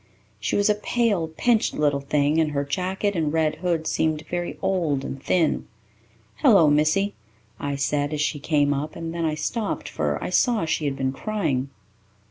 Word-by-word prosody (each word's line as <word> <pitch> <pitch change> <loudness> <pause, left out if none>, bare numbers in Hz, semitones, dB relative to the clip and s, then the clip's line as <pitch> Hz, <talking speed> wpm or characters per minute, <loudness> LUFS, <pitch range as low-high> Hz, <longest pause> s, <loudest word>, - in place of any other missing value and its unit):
She - - -1
was 205 - +3
a 210 - +5
pale, 210 -4 0
pinched 220 +8 +1
little 145 -2 +1
thing, 145 +2 +1
and 155 -2 +1
her 140 0 0
jacket 190 +6 -1
and 155 -3 0
red 160 -1 +1
hood 170 -2 -1
seemed 155 -1 0
very 175 0 -3
old 160 -8 0
and 135 - -6
thin. 165 0 +1 0.7
"Hello, 195 - +6
missy," 155 +7 +2 0.5
I 140 0 -2
said, 145 +1 0
as 150 - -2
she 150 0 0
came 145 -1 +2
up, 150 +2 -4
and 165 0 -5
then 170 -1 -1
I 155 -1 0
stopped, 210 +7 -3
for - - -1
I - - -3
saw 235 -8 +2
she 160 -1 -1
had 140 -1 -1
been 130 -1 -1
crying. 140 -7 -2
160 Hz, 180 wpm, -24 LUFS, 145-190 Hz, 0.7 s, Hello